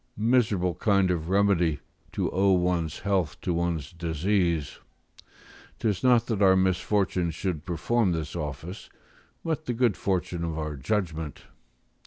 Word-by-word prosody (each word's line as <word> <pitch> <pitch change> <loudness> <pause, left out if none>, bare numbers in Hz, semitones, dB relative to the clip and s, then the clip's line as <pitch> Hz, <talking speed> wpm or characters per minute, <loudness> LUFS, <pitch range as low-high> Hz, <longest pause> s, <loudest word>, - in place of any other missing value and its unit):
Miserable 105 -6 +2
kind 100 -1 +2
of 85 -1 -2
remedy, 95 -6 +2 0.3
to - - -1
owe 95 +1 +3
one's 90 -3 0
health 95 -6 0
to 90 - -1
one's 85 -3 -2
disease! 85 -1 -1 1.0
Tis 105 -5 -1
not 120 -2 +5
that 110 -4 -2
our 95 -1 +6
misfortune 95 -1 +1
should 80 -2 -3
perform 95 +5 +1
this 80 -2 -3
office, 80 +4 -6 0.6
but 160 -1 -2
the 125 - -1
good 115 -4 +2
fortune 90 -3 -2
of 80 -1 -3
our 75 -1 -3
judgment. 80 0 -3
90 Hz, 135 wpm, -27 LUFS, 80-100 Hz, 1.0 s, our